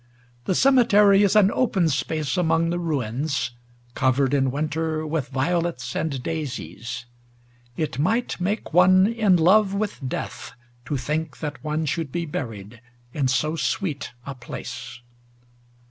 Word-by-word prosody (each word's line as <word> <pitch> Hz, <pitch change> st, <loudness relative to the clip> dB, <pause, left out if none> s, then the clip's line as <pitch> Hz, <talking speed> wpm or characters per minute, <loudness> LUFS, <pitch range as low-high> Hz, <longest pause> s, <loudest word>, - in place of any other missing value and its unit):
The 185 Hz, -, 0 dB
cemetery 210 Hz, -7 st, +5 dB
is 200 Hz, 0 st, +3 dB
an 205 Hz, -2 st, +6 dB
So8 -, -, -3 dB
ADONAIS -, -, -1 dB
open 190 Hz, -9 st, +2 dB
space 145 Hz, 0 st, -1 dB
among 165 Hz, -1 st, +2 dB
the 175 Hz, -, -1 dB
ruins, 140 Hz, -3 st, -2 dB, 0.4 s
covered 130 Hz, +1 st, +1 dB
in 135 Hz, -2 st, +2 dB
winter 155 Hz, +3 st, -2 dB
with 155 Hz, -3 st, -2 dB
violets 155 Hz, -1 st, -1 dB
and 140 Hz, -5 st, -2 dB
daisies. 125 Hz, -6 st, -5 dB, 0.7 s
It 155 Hz, -2 st, -2 dB
might 220 Hz, +6 st, 0 dB
make 200 Hz, -1 st, -2 dB
one 185 Hz, +2 st, +6 dB
in 215 Hz, -4 st, +3 dB
love 195 Hz, +4 st, +4 dB
with 210 Hz, 0 st, -2 dB
death -, -, -5 dB, 0.3 s
to 140 Hz, +3 st, -2 dB
think 150 Hz, +3 st, -3 dB
that 150 Hz, -2 st, -6 dB
one 155 Hz, +1 st, -1 dB
should 155 Hz, -1 st, -2 dB
be 170 Hz, +3 st, -2 dB
buried 115 Hz, -6 st, -6 dB, 0.3 s
in 140 Hz, -3 st, 0 dB
so 150 Hz, +5 st, 0 dB
sweet 155 Hz, -, -2 dB
a 140 Hz, -, -5 dB
place. 120 Hz, -, -8 dB
155 Hz, 145 wpm, -24 LUFS, 135-180 Hz, 0.7 s, an